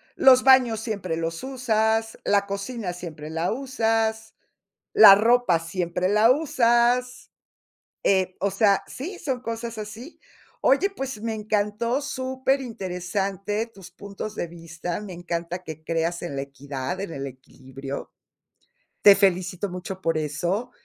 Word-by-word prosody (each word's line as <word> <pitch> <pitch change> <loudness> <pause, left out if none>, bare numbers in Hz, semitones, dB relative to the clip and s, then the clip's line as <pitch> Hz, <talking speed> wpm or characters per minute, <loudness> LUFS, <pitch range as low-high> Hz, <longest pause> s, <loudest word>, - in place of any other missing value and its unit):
los 255 -1 +6
baños 255 -4 +5
siempre 200 -7 -3
los 165 +6 -3
usas, 225 -4 0
la 200 -1 +2
cocina 200 -1 -4
siempre 155 -4 -8
la 165 +2 -1
usas, 225 -4 -1 0.6
la 410 - +10
ropa 225 -5 +3
siempre 175 +1 -2
la 215 +4 +5
usas. 250 -4 +2 0.8
Eh, 185 -1 +2
o 200 - +1
sea, 200 0 +3
sí, 355 +8 -7
son 260 -4 -3
cosas 230 -1 -5
así. 215 +8 -8 0.4
Oye, 305 +9 +4
pues 265 - -5
me 225 0 -2
encantó, 215 +4 -1
superinteresante 215 -7 -2
tus 195 -5 -14
puntos 200 +3 -7
de 175 - -3
vista. 170 +1 -6
Me 205 -3 -8
encanta 175 0 -4
que 160 -2 -9
creas 165 +1 -1
en 170 -5 -5
la 135 - -2
equidad, 140 +3 -5
en 195 -4 -5
el 140 -1 -5
equilibrio. 135 +1 -9 0.9
Te 200 -1 +9
felicito 185 0 +1
mucho 185 +1 -7
por 165 -1 0
eso. 175 - -2
200 Hz, 130 wpm, -24 LUFS, 175-235 Hz, 0.9 s, la